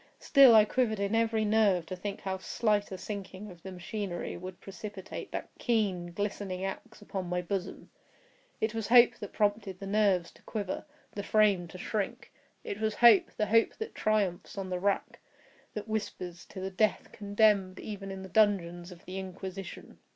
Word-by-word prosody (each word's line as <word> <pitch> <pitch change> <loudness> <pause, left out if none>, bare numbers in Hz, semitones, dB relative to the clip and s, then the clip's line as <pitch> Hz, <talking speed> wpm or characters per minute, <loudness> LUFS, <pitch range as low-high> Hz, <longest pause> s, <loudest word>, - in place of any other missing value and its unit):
Still 270 -5 +7
I 215 -1 +8
quivered 220 -2 0
in 200 +1 -1
every 225 -1 +2
nerve 205 -5 +3
to 185 - -5
think 200 +2 -5
how 190 -1 -3
slight 210 0 0
a 190 - -4
sinking 195 +1 -7
of 175 -1 -14
the 190 - -8
machinery 185 0 -4
would 185 0 -8
precipitate 195 0 -8
that - - -5
keen, 195 -7 0
glistening 195 -1 -3
axe 220 +3 -7
upon 190 -3 -4
my 180 0 0
bosom. 190 0 -4 0.7
It 220 0 0
was 225 -2 -3
hope 240 0 +6
that 205 - -7
prompted 205 -3 0
the 200 - -6
nerve 195 -4 +2
to - - -21
quiver—the 215 +3 -6
frame 200 -4 +3
to 175 - -10
shrink. 200 +2 -3 0.3
It 205 - -5
was 215 -1 0
hope—the 220 -2 +5
hope 225 +2 +3
that 445 0 -5
triumphs 205 -4 0
on 190 -1 -4
the 180 - -1
rack—that 205 +2 -4
whispers 180 -5 -4
to - - -9
the 190 +1 -4
death 215 +3 +1
condemned 205 -2 +2
even 200 -2 -6
in 190 0 -6
the - - -7
dungeons 185 -3 +2
of 175 -1 -13
the 190 +1 -5
Inquisition. 190 0 -8
200 Hz, 170 wpm, -30 LUFS, 185-215 Hz, 0.7 s, I